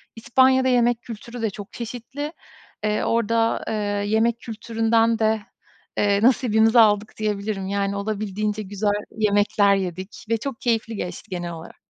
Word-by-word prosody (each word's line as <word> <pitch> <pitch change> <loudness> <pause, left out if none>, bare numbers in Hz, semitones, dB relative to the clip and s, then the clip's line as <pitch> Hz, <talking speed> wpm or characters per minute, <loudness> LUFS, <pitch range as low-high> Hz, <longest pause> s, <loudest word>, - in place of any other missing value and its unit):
İspanya'da 260 +3 +3
yemek 240 -1 +3
kültürü 235 +1 -8
de 225 - +1
çok 200 0 -10
çeşitli, 250 +6 -6 0.5
eee, 215 0 0
orada, 230 0 +1
eee, - - -2 0.4
yemek 230 +2 +2
kültüründen 225 0 +1
de, 220 0 +2 0.6
eee, 200 0 +2
nasibimizi 230 -2 +4
aldık 210 -1 +4
diyebilirim. 205 -2 -2
Yani 200 0 -1
olabildiğince 210 0 -2
güzel 205 +1 -2 0.3
yemekler 205 -1 +3
yedik 190 +5 -5
ve 230 - +2
çok 265 +2 -6
keyifli 225 -2 0
geçti 180 -3 -6
genel 175 -2 -4
olarak. 165 0 -10
220 Hz, 135 wpm, -23 LUFS, 205-230 Hz, 0.6 s, nasibimizi